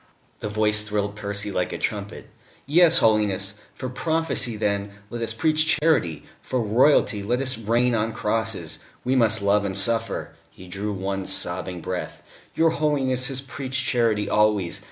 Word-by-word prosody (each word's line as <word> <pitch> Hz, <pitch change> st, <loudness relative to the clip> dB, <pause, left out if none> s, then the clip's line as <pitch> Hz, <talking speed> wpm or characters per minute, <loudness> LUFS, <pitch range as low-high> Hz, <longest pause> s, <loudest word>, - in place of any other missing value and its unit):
The 105 Hz, -, -4 dB
voice 105 Hz, 0 st, +2 dB
thrilled 105 Hz, -1 st, -2 dB
Percy 100 Hz, 0 st, -3 dB
like 90 Hz, -2 st, -1 dB
a -, -, -4 dB
trumpet. 105 Hz, 0 st, -4 dB, 0.4 s
"Yes, 165 Hz, +3 st, +6 dB
Holiness.... 105 Hz, -3 st, +2 dB, 0.2 s
For 130 Hz, -, -5 dB
prophecy, 160 Hz, -2 st, 0 dB
then, 100 Hz, -1 st, -1 dB, 0.2 s
let 120 Hz, -1 st, -5 dB
us 115 Hz, -, -2 dB
preach 155 Hz, -1 st, +2 dB
charity; 150 Hz, -, +1 dB, 0.2 s
for 130 Hz, -, -2 dB
Royalty, 115 Hz, -1 st, +3 dB
let 120 Hz, +5 st, 0 dB
us 130 Hz, -1 st, -2 dB
reign 120 Hz, +3 st, +1 dB
on 110 Hz, 0 st, 0 dB
crosses. 110 Hz, -6 st, -2 dB, 0.2 s
We 130 Hz, +2 st, +1 dB
must 110 Hz, -4 st, +3 dB
love 100 Hz, +1 st, +3 dB
and 95 Hz, -1 st, -2 dB
suffer...." 115 Hz, +3 st, 0 dB, 0.2 s
(He 90 Hz, -, -14 dB
drew 100 Hz, +4 st, -4 dB
one 95 Hz, 0 st, -3 dB
sobbing 90 Hz, -1 st, -1 dB
breath.) 90 Hz, +1 st, -5 dB, 0.3 s
"Your 165 Hz, 0 st, +3 dB
Holiness 135 Hz, -5 st, 0 dB
has 135 Hz, -1 st, -4 dB
preached 130 Hz, -1 st, -4 dB
charity 115 Hz, -5 st, +1 dB
always. 105 Hz, -4 st, +2 dB
110 Hz, 155 wpm, -24 LUFS, 100-130 Hz, 0.4 s, Yes